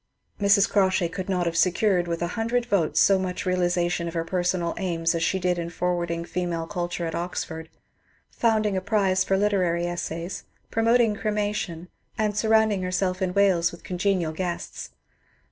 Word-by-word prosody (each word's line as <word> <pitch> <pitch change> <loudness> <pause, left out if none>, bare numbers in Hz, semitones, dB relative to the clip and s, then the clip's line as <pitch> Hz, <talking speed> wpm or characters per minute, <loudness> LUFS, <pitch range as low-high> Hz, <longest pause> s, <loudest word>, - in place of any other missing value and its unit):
Mrs. 200 0 +4
Crawshay 190 -3 +2
could 185 +3 -6
not 180 -2 0
have 170 -1 -1
secured 180 0 +2
with 170 0 -2
a 175 - -1
hundred 235 +2 0
votes 200 -9 +1
so 195 -1 +5
much 185 -1 -3
realization 175 -1 0
of 170 - -6
her 165 - 0
personal 175 -1 0
aims 165 -3 0
as 165 - -2
she 190 - +1
did 180 -1 0
in 170 0 -3
forwarding 170 -1 -2
female 175 -2 -2
culture 175 -1 -3
at 165 - -3
Oxford, 160 -2 -4 0.6
founding 215 -3 +1
a 185 - 0
prize 190 -2 +2
for 195 +1 +1
literary 185 -4 +1
essays, 175 0 -4 0.3
promoting 230 0 +3
cremation, 205 -5 -2 0.3
and 210 -2 0
surrounding 220 -2 +3
herself 185 +1 -1
in 185 0 -1
Wales 185 -4 +3
with 170 - -13
congenial 180 -3 0
guests. 175 +1 -4
180 Hz, 160 wpm, -25 LUFS, 170-200 Hz, 0.6 s, so